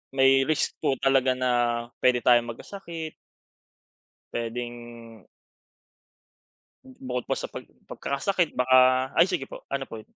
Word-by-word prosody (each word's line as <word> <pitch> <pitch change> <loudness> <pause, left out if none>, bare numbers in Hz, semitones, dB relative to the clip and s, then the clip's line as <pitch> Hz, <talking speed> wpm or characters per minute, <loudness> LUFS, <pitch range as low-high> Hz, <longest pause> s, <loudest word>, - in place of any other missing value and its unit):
may 135 0 +4
risk 155 - +1
po 135 - +1
talaga 135 -1 +3
na 130 -1 0 0.5
puwede 125 -1 +2
tayong 120 -1 +4
magkasakit 165 - -7 1.2
puwedeng, 120 -2 -7 1.7
Bukod 125 -1 -4
pa - - +1
sa - - -4
pag - - -8 0.2
pagkakasakit 170 +4 -2
baka 130 0 +4
ay 165 - +7
sige 170 -8 -2
po, - - -10
ano 135 -1 -2
po? 110 -1 -9
130 Hz, 120 wpm, -26 LUFS, 120-135 Hz, 1.7 s, ay